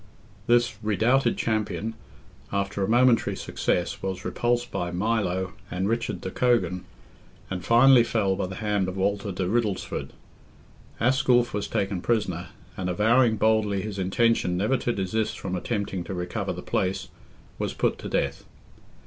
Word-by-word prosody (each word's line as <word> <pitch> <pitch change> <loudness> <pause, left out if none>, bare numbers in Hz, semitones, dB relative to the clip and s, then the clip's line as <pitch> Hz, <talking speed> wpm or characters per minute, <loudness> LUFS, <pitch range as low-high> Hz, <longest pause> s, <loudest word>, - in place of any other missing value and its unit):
This 120 -2 +3
redoubted 120 +4 +2
champion, 110 -1 -1 0.6
after 100 0 -1
a - - 0
momentary 120 +1 +4
success, 90 - -1
was 95 -1 -4
repulsed 120 0 0
by 85 - -2
Milo 95 -1 -1 0.2
and 95 +2 -1
Richard 115 +2 -1
de - - -5
Cogan, 120 -7 +1 0.7
and 90 -1 -3
finally 120 +1 +6
fell 100 -5 +1
by 95 - -2
the 95 - -7
hand 105 -3 0
of 95 +1 -4
Walter 100 +1 0
de 90 0 -2
Riddlesford. 105 -2 -1 0.9
Asculph 120 -1 +3
was 105 0 -2
taken 95 -2 -1
prisoner, 90 -6 -1 0.3
and, 90 -1 -3
avowing 115 +5 +3
boldly 105 -2 +2
his 105 -2 -5
intention 95 -1 +2
never 105 +8 +2
to 120 -1 -1
desist 105 +2 -1
from 95 -1 -4
attempting 100 -1 -2
to 95 - -5
recover 90 0 -3
the - - -6
place, 95 0 -1 0.5
was - - -2
put - - 0
to - - -6
death. - - -1
105 Hz, 150 wpm, -26 LUFS, 95-115 Hz, 0.9 s, finally